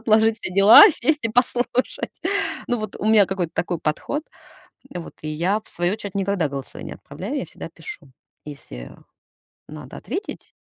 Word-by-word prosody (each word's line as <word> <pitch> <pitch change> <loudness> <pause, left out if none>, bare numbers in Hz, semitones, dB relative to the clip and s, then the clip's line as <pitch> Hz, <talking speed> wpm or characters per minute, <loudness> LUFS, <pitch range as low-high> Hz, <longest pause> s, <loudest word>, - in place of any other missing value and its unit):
отложить 220 0 +3
все 185 - -5
дела, 200 - +10
сесть 305 -1 0
и - - +2
послушать. 245 +2 0 0.6
Ну, 245 -1 +1
вот 215 - -5
у - - -6
меня 215 -2 +6
какой-то 180 -4 -2
такой 175 -1 -1
подход. 170 - -2 0.7
Вот 175 -2 -7
и 155 - -6
я, 180 +7 0
в - - -20
свою 175 +3 -1
очередь, 200 -2 -7
никогда 195 -6 0
голосовые 135 -1 -7
не - - -6
отправляю. - - -7
Я - - -3
всегда - - -9
пишу, 415 - -10 0.3
если 65 - -9 0.8
надо 150 -3 -10
ответить. 355 - -6
200 Hz, 165 wpm, -22 LUFS, 165-225 Hz, 0.8 s, дела